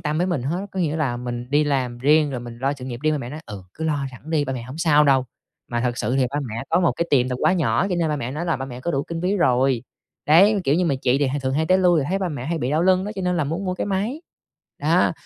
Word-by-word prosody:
tâm 150 Hz, +1 st, -1 dB
với 180 Hz, -, +1 dB
mình 175 Hz, -9 st, -1 dB
hết. 175 Hz, +9 st, -2 dB
Có 190 Hz, -, -2 dB
nghĩa 155 Hz, -2 st, 0 dB
là 140 Hz, -6 st, -1 dB
mình 120 Hz, 0 st, -5 dB
đi 145 Hz, +1 st, +3 dB
làm 130 Hz, -4 st, -1 dB
riêng 150 Hz, +3 st, +3 dB
rồi 125 Hz, -, -4 dB
mình 120 Hz, -1 st, -9 dB
lo 135 Hz, +3 st, 0 dB
sự 135 Hz, -3 st, -8 dB
nghiệp 120 Hz, -2 st, -6 dB
riêng, 155 Hz, 0 st, +2 dB
ba 150 Hz, -, -1 dB
mẹ 120 Hz, -, -6 dB
nói: 155 Hz, -, -7 dB
“Ừ, 100 Hz, -2 st, -8 dB
cứ 160 Hz, -, -5 dB
lo 145 Hz, -3 st, 0 dB
sẵn 130 Hz, +5 st, -12 dB
đi, 150 Hz, -3 st, +2 dB
ba 135 Hz, -, -3 dB
mẹ 125 Hz, -3 st, -4 dB
hổng 130 Hz, +5 st, -9 dB
sao 150 Hz, -3 st, +4 dB
đâu.” 135 Hz, -2 st, +4 dB, 0.4 s
Mà 120 Hz, -1 st, -1 dB
thực 120 Hz, 0 st, -1 dB
sự 120 Hz, +3 st, 0 dB
thì 130 Hz, -2 st, +2 dB
ba 145 Hz, -, -2 dB
mẹ 115 Hz, +2 st, -4 dB
có 170 Hz, +3 st, +3 dB
một 170 Hz, -, +3 dB
cái 170 Hz, -, -2 dB
tiệm 130 Hz, -3 st, +3 dB
tạp 125 Hz, -1 st, -3 dB
hóa -, -, +4 dB
nhỏ 185 Hz, +1 st, +1 dB
cho 185 Hz, -, -1 dB
nên 170 Hz, -2 st, +1 dB
ba 150 Hz, -, 0 dB
mẹ 125 Hz, -3 st, -4 dB
nói 150 Hz, +5 st, -4 dB
là 170 Hz, -2 st, 0 dB
ba 135 Hz, -, -4 dB
mẹ 125 Hz, -2 st, -8 dB
có 170 Hz, -, -2 dB
đủ 140 Hz, -3 st, 0 dB
kinh 165 Hz, +2 st, -5 dB
phí 190 Hz, +3 st, +1 dB
rồi. 130 Hz, -, +2 dB, 0.4 s
Đấy, 195 Hz, +7 st, +6 dB
kiểu 140 Hz, -, +3 dB
như, 180 Hz, -, +2 dB
mà 155 Hz, -5 st, +1 dB
chị 130 Hz, +2 st, +2 dB
thì 145 Hz, -, +2 dB
h 130 Hz, -, -2 dB
thường 130 Hz, 0 st, -1 dB
hay 160 Hz, +2 st, +1 dB
tới 185 Hz, +2 st, +4 dB
lui 180 Hz, -3 st, +4 dB
rồi 140 Hz, -, -2 dB
thấy 195 Hz, +2 st, 0 dB
ba 190 Hz, -, -1 dB
mẹ 140 Hz, -6 st, -5 dB
hay 165 Hz, +1 st, -1 dB
bị 130 Hz, -3 st, -2 dB
đau 155 Hz, +3 st, +2 dB
lưng 185 Hz, +1 st, +3 dB
đó 205 Hz, -, -4 dB
cho 190 Hz, -, -4 dB
nên 180 Hz, 0 st, 0 dB
là 155 Hz, -, +1 dB
muốn 165 Hz, +7 st, -3 dB
mua 185 Hz, -1 st, -1 dB
cái -, -, -3 dB
máy. 205 Hz, -, -2 dB, 0.6 s
Đó, -, -, +2 dB
150 Hz, 330 wpm, -22 LUFS, 130-170 Hz, 0.6 s, Đấy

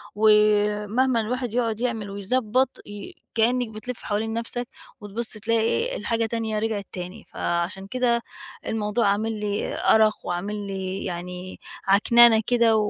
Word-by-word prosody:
ومهمًا 210 Hz, +3 st, +3 dB
الواحد 245 Hz, +1 st, -3 dB
يقعُد 230 Hz, -3 st, 0 dB
يعمل 225 Hz, -5 st, -2 dB
ويضبّط 230 Hz, +5 st, +1 dB, 0.2 s
ي 205 Hz, -1 st, -8 dB, 0.2 s
كإنِك 240 Hz, +1 st, +2 dB
بتلِف 220 Hz, +3 st, -7 dB
حوالين 220 Hz, +1 st, -1 dB
نَفْسك 235 Hz, +1 st, -3 dB, 0.3 s
وتبُص 215 Hz, +3 st, -4 dB
تلاقي 225 Hz, +1 st, 0 dB
إيه، 480 Hz, -, 0 dB
الحاجة 230 Hz, -1 st, 0 dB
تانية 220 Hz, -1 st, -2 dB
رجعت 215 Hz, -3 st, -2 dB
تاني، 185 Hz, +4 st, -7 dB
فعشان 180 Hz, +3 st, -2 dB
كده 240 Hz, 0 st, +1 dB, 0.5 s
الموضوع 210 Hz, 0 st, 0 dB
عامل 215 Hz, +2 st, 0 dB
لي 205 Hz, -1 st, -2 dB, 0.2 s
أرَق 215 Hz, -1 st, +5 dB
وعامل 200 Hz, +3 st, -3 dB
لي 190 Hz, -1 st, -4 dB
يعني 180 Hz, +1 st, -6 dB, 0.3 s
عكننة 225 Hz, +3 st, +6 dB
كده 235 Hz, -2 st, +4 dB
و 210 Hz, -1 st, +1 dB
215 Hz, 135 wpm, -24 LUFS, 205-235 Hz, 0.5 s, عكننة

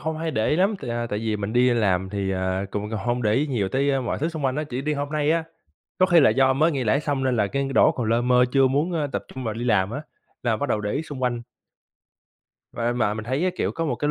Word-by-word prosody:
không 160 Hz, 0 st, -3 dB
hay 165 Hz, 0 st, -2 dB
để 110 Hz, -6 st, 0 dB
ý 150 Hz, -, +2 dB
lắm, 195 Hz, +5 st, +2 dB
tại, 120 Hz, -, -5 dB
à, 120 Hz, 0 st, -2 dB
tại 105 Hz, -2 st, -3 dB
vì 110 Hz, -1 st, -1 dB
mình 105 Hz, +1 st, -4 dB
đi 125 Hz, +1 st, +4 dB
làm 95 Hz, -5 st, +1 dB
thì, 100 Hz, -1 st, -2 dB
ờ, 95 Hz, +1 st, -1 dB
cũng 105 Hz, +1 st, -3 dB
h -, -, -4 dB
hông 120 Hz, +4 st, -1 dB
để 105 Hz, -2 st, +2 dB
ý 145 Hz, +5 st, +1 dB
nhiều 115 Hz, -9 st, -1 dB
tới, 135 Hz, +6 st, +1 dB
ơ, 135 Hz, -1 st, +1 dB
mọi 125 Hz, -, -2 dB
thứ 155 Hz, -, 0 dB
xung 160 Hz, -4 st, -5 dB
quanh 130 Hz, 0 st, 0 dB
á, 150 Hz, -, -1 dB
chỉ 130 Hz, -2 st, -5 dB
đi 150 Hz, +2 st, -1 dB
hôm 145 Hz, -1 st, -2 dB
nay 150 Hz, 0 st, +1 dB
á. 165 Hz, 0 st, +1 dB, 0.5 s
Có 185 Hz, -, +5 dB
khi 175 Hz, -3 st, +5 dB
là -, -, +6 dB
do 135 Hz, 0 st, +3 dB
mới 155 Hz, +5 st, +3 dB
nghỉ 135 Hz, -4 st, -2 dB
lễ 130 Hz, +6 st, +2 dB
xong 145 Hz, -3 st, -1 dB
nên 130 Hz, -2 st, +1 dB
là 105 Hz, -2 st, +2 dB
cái 140 Hz, +5 st, -2 dB
đổ -, -, +5 dB
còn 120 Hz, -3 st, -3 dB
lơ 115 Hz, +1 st, +2 dB
mơ 125 Hz, 0 st, +4 dB
chưa 135 Hz, -1 st, +5 dB
muốn, 145 Hz, +7 st, 0 dB
ơ, 155 Hz, -3 st, 0 dB
tập -, -, -3 dB
trung 130 Hz, -, -6 dB
vào 110 Hz, -2 st, -2 dB
đi 120 Hz, +2 st, -4 dB
làm 105 Hz, -5 st, +2 dB
á 140 Hz, +6 st, -5 dB, 0.4 s
là 115 Hz, -3 st, +1 dB
bắt 145 Hz, -, -3 dB
đầu 110 Hz, -, 0 dB
để 105 Hz, 0 st, -2 dB
ý 145 Hz, -, -1 dB
xung 145 Hz, -5 st, -8 dB
quanh. 120 Hz, -2 st, 0 dB, 1.3 s
Và 120 Hz, +1 st, -1 dB
mà 110 Hz, -4 st, 0 dB
mình 110 Hz, 0 st, -6 dB
thấy 130 Hz, +5 st, -1 dB
cái 185 Hz, -, +2 dB
kiểu -, -, -1 dB
có 165 Hz, -, -3 dB
một 140 Hz, -, 0 dB
cái 145 Hz, -, -1 dB
125 Hz, 305 wpm, -24 LUFS, 110-145 Hz, 1.3 s, là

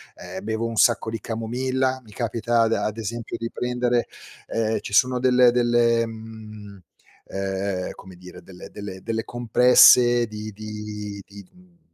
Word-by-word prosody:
ehm, -, -, -9 dB
bevo 110 Hz, +2 st, -2 dB
un 115 Hz, -, -5 dB
sacco 115 Hz, 0 st, +3 dB
di 110 Hz, -2 st, -5 dB
camomilla, 130 Hz, +3 st, -2 dB
mi 110 Hz, -, -17 dB
capita 115 Hz, +2 st, -1 dB
ad 115 Hz, 0 st, +1 dB
ad 110 Hz, -1 st, -2 dB
esempio 115 Hz, +1 st, -5 dB
di 115 Hz, -, -4 dB
prendere, 125 Hz, -1 st, -1 dB, 0.4 s
ehm, 110 Hz, -1 st, -1 dB
ci -, -, -8 dB
sono 125 Hz, +4 st, +3 dB
delle 125 Hz, -1 st, +5 dB
delle 120 Hz, -1 st, +2 dB
mhmm, 110 Hz, -2 st, -11 dB, 0.5 s
ehm, 95 Hz, -1 st, -3 dB
come 95 Hz, -1 st, -13 dB
dire, 90 Hz, 0 st, -13 dB
delle 90 Hz, 0 st, -12 dB
delle 100 Hz, -2 st, -8 dB
delle 110 Hz, 0 st, -3 dB
compresse 120 Hz, 0 st, +5 dB
di 110 Hz, 0 st, -7 dB
di 105 Hz, -1 st, -7 dB
di 100 Hz, 0 st, -13 dB
d 90 Hz, -, -27 dB
mhmm 180 Hz, -1 st, -23 dB
115 Hz, 155 wpm, -23 LUFS, 105-120 Hz, 0.5 s, delle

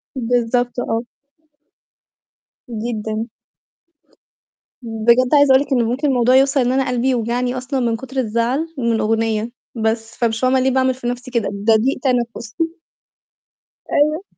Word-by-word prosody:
بالضبط 245 Hz, 0 st, 0 dB
آه. 230 Hz, -1 st, -1 dB, 1.7 s
جدًا. 220 Hz, -1 st, -3 dB, 1.5 s
بجد 235 Hz, +3 st, +2 dB
عايزة 285 Hz, -2 st, +6 dB
أقول 265 Hz, -, +6 dB
لِك 285 Hz, -, -6 dB
إنه 245 Hz, -, +3 dB
ممكن 280 Hz, +5 st, -1 dB
الموضوع 250 Hz, -1 st, +3 dB
يوصل 270 Hz, +1 st, +4 dB
إن 245 Hz, 0 st, +1 dB
أنا 265 Hz, 0 st, +1 dB
قلبي 250 Hz, +1 st, 0 dB
يوجعني 245 Hz, +1 st, -1 dB
أصلًا 255 Hz, +1 st, -3 dB
من 235 Hz, -2 st, 0 dB
كتر 265 Hz, +2 st, -9 dB
الزعل 240 Hz, +6 st, 0 dB
من 235 Hz, -3 st, 0 dB
أغنية 225 Hz, +1 st, 0 dB, 0.2 s
بس، 225 Hz, 0 st, -2 dB
فمش 225 Hz, -2 st, 0 dB
فاهمة 255 Hz, +1 st, +2 dB
ليه 260 Hz, +1 st, +2 dB
باعمل 260 Hz, 0 st, +2 dB
في 250 Hz, -1 st, -6 dB
نفسي 245 Hz, +1 st, -4 dB
كده؟ 235 Hz, -3 st, 0 dB
ده 205 Hz, +3 st, +2 dB
ضيق 245 Hz, +5 st, +1 dB
تنفُس. 235 Hz, -3 st, -1 dB, 1.4 s
أيوه. 305 Hz, +5 st, +2 dB
245 Hz, 140 wpm, -19 LUFS, 225-260 Hz, 1.7 s, عايزة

